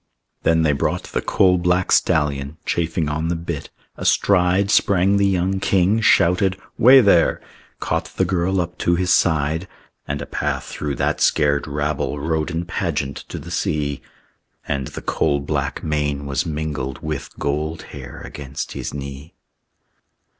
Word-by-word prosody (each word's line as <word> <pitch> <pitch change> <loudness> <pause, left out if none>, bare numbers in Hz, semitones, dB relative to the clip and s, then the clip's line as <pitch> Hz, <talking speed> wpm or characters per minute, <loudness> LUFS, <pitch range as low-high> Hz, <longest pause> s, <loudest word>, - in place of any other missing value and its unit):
Then 80 0 +3
they 75 - +3
brought 70 - -1
the - - -3
coal 90 -2 +3
black 90 +1 +1
stallion, 70 0 +1
Chafing 80 -1 -1
on 75 +2 -2
the 85 - 0
bit. 85 -2 -5 0.3
Astride 95 +1 +2
Sprang 100 +1 +3
the 100 0 +3
young 95 0 0
king; 100 +2 +2
shouted, 95 -1 +3 0.2
"Way 130 +3 +8
there!" 100 -6 +4 0.4
Caught - - -1
the 95 - +3
girl 90 +1 0
up 85 0 -3
to 85 - +2
his 90 +1 0
side; 80 +1 +1 0.4
And - - -2
a - - -5
path - - -2
through 75 -2 -4
that - - -1
scared 70 0 +2
rabble 75 0 -2
Rode 80 +1 -1
in 85 +1 -3
pageant 70 -4 -2
to - - -5
the - - -9
sea. 70 -2 -1 0.7
And 70 -2 -2
the - - -8
coal 70 - +1
black 70 - -3
mane 75 -2 -1
was 70 +5 -1
mingled 75 -4 -4
With 75 -3 -5
gold 75 +3 -2
hair 65 -4 -9
against 70 -2 -6
his - - -5
knee. 70 +2 -8
80 Hz, 155 wpm, -21 LUFS, 70-90 Hz, 0.7 s, Way